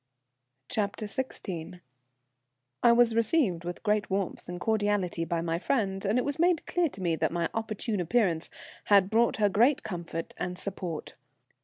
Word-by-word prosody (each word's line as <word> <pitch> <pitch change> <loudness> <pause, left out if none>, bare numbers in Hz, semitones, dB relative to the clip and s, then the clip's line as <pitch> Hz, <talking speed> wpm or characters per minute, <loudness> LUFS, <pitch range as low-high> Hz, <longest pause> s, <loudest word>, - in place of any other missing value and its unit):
CHAPTER 210 0 -2
XVI. 190 - -5 1.0
I 235 - +6
was 235 -1 +5
received 225 - +2
with 175 0 -6
great 210 -1 +1
warmth 190 -2 -2
and 175 0 -5
cordiality 205 -5 0
by 170 0 -1
my 165 0 -1
friend, 195 -4 0
and 205 +5 +2
it 250 - +1
was 285 +1 -2
made 345 -1 +3
clear 350 -2 +1
to 195 - -10
me 170 -2 +2
that - - 0
my 170 -1 -1
opportune 220 -1 -2
appearance 175 -3 +1 0.6
brought 230 +1 +3
her 210 -2 +4
great 245 +9 +3
comfort 170 -5 -5
and 180 0 -3
support. 180 -4 -5
205 Hz, 155 wpm, -29 LUFS, 175-230 Hz, 1.0 s, I